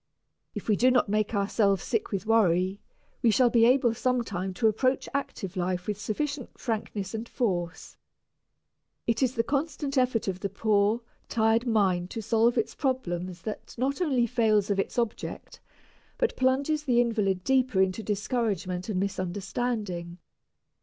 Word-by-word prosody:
If - - -6
we 215 - +4
do 250 +5 +4
not 250 -4 +3
make 215 +1 0
ourselves 200 -1 +2
sick 225 -3 -2
with 195 0 -2
worry, 190 -3 +2 0.4
we 235 - +4
shall 245 +2 +4
be 230 -1 +5
able 250 -2 +4
sometime 230 -7 -1
to 225 - +2
approach 255 +5 +1
active 200 -9 -4
life 180 0 -1
with 210 -1 -3
sufficient 285 +5 -3
frankness 215 -4 -3
and 225 +1 -5
force. 175 -8 -2 1.1
It 230 +2 0
is 260 0 +1
the 230 - +2
constant 280 0 -1
effort 245 -4 +1
of 185 -1 -2
the 200 - -2
poor, 215 +2 +2 0.3
tired 225 +2 +2
mind 190 -6 +2
to 225 - -5
solve 230 +2 +2
its 230 - 0
problems 185 - -2
that 215 - -6
not 275 +7 -1
only 265 -8 +2
fails 220 -4 +2
of 195 - +1
its 195 - -2
object, 235 -2 -3 0.6
but 485 - 0
plunges 280 +4 +1
the 245 -3 +3
invalid 210 -6 +1
deeper 255 -5 +2
into 190 +3 +2
discouragement 205 -4 -2
and 190 -4 0
misunderstanding. 190 -1 -3
220 Hz, 155 wpm, -27 LUFS, 195-250 Hz, 1.1 s, be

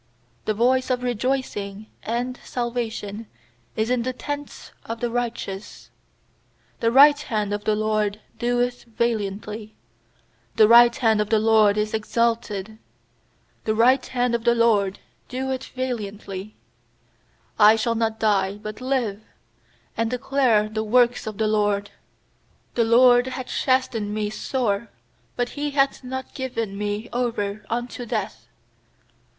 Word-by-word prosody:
15The 215 - +1
voice 255 +4 +2
of 250 -1 0
rejoicing 235 -4 -2 0.2
and 245 +3 -3
salvation 230 -3 -4 0.5
is 220 +2 0
in 250 -1 +2
the 255 +2 -2
tents 290 +2 -6
of 230 0 -6
the 240 0 -2
righteous; 230 -5 -5 0.9
The 230 - +2
right 290 +3 +7
hand 215 -8 -2
of 205 0 -4
the 215 - +2
LORD 215 -1 0 0.2
doeth 245 +1 0
valiantly. 215 -2 -3 0.8
16The 215 - +7
right 235 0 +8
hand 220 -3 +2
of 210 - -2
the 220 - +4
LORD 215 -1 +4
is 215 0 -1
exalted; 220 -2 -1 0.9
The 215 - +1
right 250 +4 +4
hand 245 -2 -1
of 235 -1 0
the 235 0 +3
LORD 210 -4 +2 0.3
doeth 260 +1 -3
valiantly. 215 -5 -5 1.0
17I 215 +1 +7
shall 230 +1 +1
not 225 -1 -1
die, 200 -2 +1
but 215 +2 -8
live, 250 -6 -1 0.7
And 230 0 0
declare 250 -3 +2
the 220 0 -3
works 240 +1 +2
of 215 -2 -5
the 220 - +1
LORD. 205 -1 +1 0.8
18The 230 -2 +1
LORD 245 +1 +6
hath 260 0 -5
chastened 255 -6 0
me 210 -1 -2
sore; 225 -2 -2 0.5
But 245 0 -1
He 295 0 -3
hath 275 -1 +1
not 260 +1 -6
given 230 -6 -4
me 205 +2 -3
over 215 -4 -2
unto 240 +1 -4
death. 215 -2 -4
230 Hz, 135 wpm, -23 LUFS, 210-245 Hz, 1.0 s, right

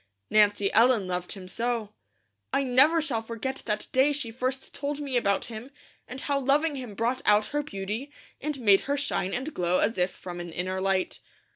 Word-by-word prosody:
Nancy 205 -2 +4
Ellen 230 -3 +5
loved 180 -1 -3
him 190 -2 -10
so. 230 0 -2 0.6
I 275 - +2
never 275 +6 +4
shall 245 -8 -1
forget 230 +4 -4
that 210 -1 -1
day 265 +3 +4
she 270 -6 -3
first 255 +3 -3
told 285 +1 -3
me 280 -3 -3
about 200 -5 +2
him, 230 +3 -8 0.4
and 260 +2 -6
how 280 -1 0
loving 285 +3 +2
him 250 -6 -7
brought 240 +4 0
out 210 0 +4
her 295 - +1
beauty, 220 +2 -5 0.3
and 295 -1 -3
made 200 -4 +6
her 285 - +2
shine 275 -9 -1
and 265 +8 -3
glow 180 0 +1
as 205 -2 +1
if 180 +1 +3
from 180 -1 -8
an 175 -1 -6
inner 185 +3 -3
light. 190 -1 0
230 Hz, 190 wpm, -27 LUFS, 195-270 Hz, 0.6 s, made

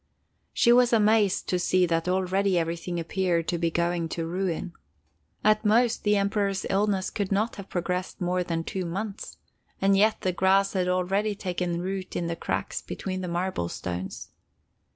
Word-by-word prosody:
She 235 - +4
was 245 0 +5
amazed 215 -3 +3
to 180 - +1
see 180 +1 +3
that 165 0 0
already 190 +1 +1
everything 170 +1 -2
appeared 170 0 0
to 175 - -1
be 170 0 +1
going 170 0 -1
to 165 0 -3
ruin. 180 0 -2 0.7
At 215 +1 +4
most, 230 +2 +3
the 210 0 +3
Emperor's 200 -1 0
illness 195 -1 +1
could 205 -2 -3
not 215 +4 0
have 200 -1 -9
progressed 180 +1 -3
more 180 0 0
than 165 -2 -2
two 185 +2 -3
months, 195 +4 -5 0.4
and 195 0 +3
yet 215 +3 +3
the 185 - +1
grass 195 +2 +3
had 185 -2 0
already 195 +3 0
taken 180 -3 -2
root 190 0 -4
in 175 - -1
the 170 0 -2
cracks - - -3
between 185 -1 -5
the 180 - -4
marble 175 - -2
stones. 90 +1 -5
185 Hz, 170 wpm, -26 LUFS, 175-200 Hz, 0.7 s, was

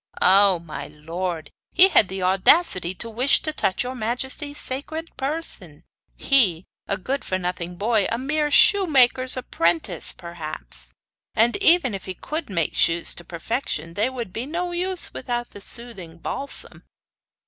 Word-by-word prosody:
'Oh, 195 0 +5
my 165 -2 -8
lord, 165 +2 -5 0.2
he 375 +2 +7
had 215 - +5
the 190 0 -5
audacity 185 - +3
to 230 - -4
wish 245 +5 +3
to 310 - -1
touch 190 -8 0
your 250 +1 -5
majesty's 260 +5 -4
sacred 315 +5 -5
person 270 - -2 0.3
he, 195 - +3 0.2
a 200 - -1
good 265 +8 -3
for 185 - -1
nothing 180 -1 -4
boy, 215 +1 +1
a 230 - 0
mere 295 +4 -1
shoemaker's 270 - +5
apprentice, 170 -9 0
perhaps! 170 -3 -8 0.4
And 230 +2 +3
even 340 - +4
if 195 - -6
he 185 - -6
could 310 - -5
make 170 -5 -1
shoes 165 0 +3
to 175 - -10
perfection 170 - -4
they 210 +7 0
would 235 -8 -6
be 240 +4 -4
no 350 +3 -3
use 360 +1 -1
without 240 -1 -4
the 205 - -12
soothing 200 -8 -6
balsam. 275 +11 -3
230 Hz, 150 wpm, -23 LUFS, 180-275 Hz, 0.4 s, he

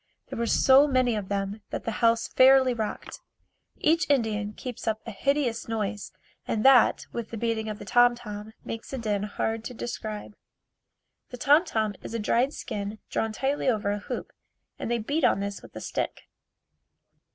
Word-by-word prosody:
There - - -5
were 235 - 0
so 270 +5 +6
many 255 -3 +2
of 205 -3 -4
them 200 +1 -2
that - - -4
the 225 - -2
house 230 -1 +3
fairly 260 -1 +6
rocked. 220 -3 -5 0.6
Each 330 0 +2
Indian 215 -6 +1
keeps 245 +1 -7
up 220 -1 0
a 230 - -5
hideous 265 +1 0
noise 210 -2 -3 0.4
and 215 +1 -1
that 265 -3 +6
with 235 -2 -4
the 230 - -6
beating 220 -1 -1
of 210 - -4
the - - -10
tom 245 0 +5
tom 215 -2 -8
makes 225 0 -6
a - - -2
din 210 -4 -1
hard 220 +2 -2
to 250 - -6
describe. 215 -3 -6 0.9
The 250 - -8
tom 295 +7 +5
tom 220 - -1
is 230 - -7
a - - -1
dried 240 +5 +2
skin 205 -5 -5
drawn 225 - 0
tightly 270 +6 -1
over 210 -4 0
a 205 - -2
hoop 205 - -6 0.5
and - - -4
they 240 - +1
beat 285 +8 -2
on - - +4
this 200 0 -4
with - - -15
a - - -6
stick. - - -3
225 Hz, 185 wpm, -27 LUFS, 210-250 Hz, 0.9 s, so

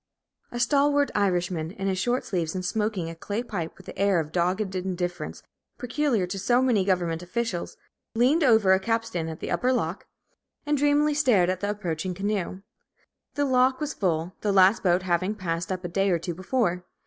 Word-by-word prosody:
A 240 - -4
stalwart 285 +3 +3
Irishman, 180 -5 0
in 195 - -5
his 190 -1 0
shirt 245 +6 0
sleeves, 170 -3 -2
and 185 -1 -3
smoking 210 -3 -1
a 165 - -5
clay 205 +7 -4
pipe 175 -9 -5
with 190 - -15
that - - -10
air 200 -3 +3
of 155 -1 -4
dogged 185 +3 0
indifference 180 -1 -4 0.3
peculiar 250 -5 0
to 190 +2 -5
so 240 +6 +3
many 245 -7 +3
government 175 -3 0
officials, 180 0 -3 0.4
leaned 265 +8 +3
over 220 -7 +5
a 190 - +3
capstan 225 -6 -2
at 160 - -8
the - - -4
upper 255 0 +1
lock, 200 -7 -2 0.6
and 295 0 +1
dreamily 290 +1 +3
stared 235 -12 +3
at 185 - -3
the 205 - -2
approaching 180 -3 -3
canoe. 195 -1 -3 0.7
The 290 - +1
lock 260 0 +3
was 300 -1 -3
full, 170 -2 -1
the 210 - +1
last 195 +2 +5
boat 180 -1 +2
having 185 +3 0
passed 170 -3 -3
up 185 0 -3
a - - -2
day 195 +3 +1
or 175 - +3
two 170 +1 -4
before. 185 -1 -1
195 Hz, 190 wpm, -26 LUFS, 180-235 Hz, 0.7 s, over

